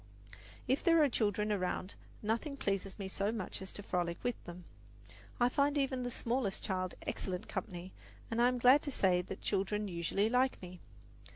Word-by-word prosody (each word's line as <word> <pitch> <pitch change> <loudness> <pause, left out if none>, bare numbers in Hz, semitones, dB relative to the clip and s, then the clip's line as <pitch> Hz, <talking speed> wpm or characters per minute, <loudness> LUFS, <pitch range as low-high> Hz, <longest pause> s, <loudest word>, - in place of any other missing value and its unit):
If 265 - +1
there 330 -2 +6
are 290 - +4
children 210 -2 +1
around, 185 -1 -1 0.3
nothing 235 +7 -1
pleases 195 -5 -2
me 195 -2 -4
so 200 +2 0
much 210 -4 -4
as 190 - -5
to 205 - -7
frolic 175 -3 -1
with 245 0 +1
them. 175 +1 -8 0.8
I 240 - +5
find 285 +3 +2
even 265 -2 +1
the 245 - -2
smallest 235 -4 -1
child 185 -2 -1
excellent 185 +2 -3
company, 185 -1 -5 0.4
and 230 +1 +1
I 240 - +6
am 250 0 +1
glad 255 +4 +7
to 290 - -3
say 185 -7 +3
that 190 +2 -7
children 205 +1 0
usually 180 +3 0
like 250 +3 +2
me. 180 -1 -9
210 Hz, 180 wpm, -34 LUFS, 185-250 Hz, 0.8 s, glad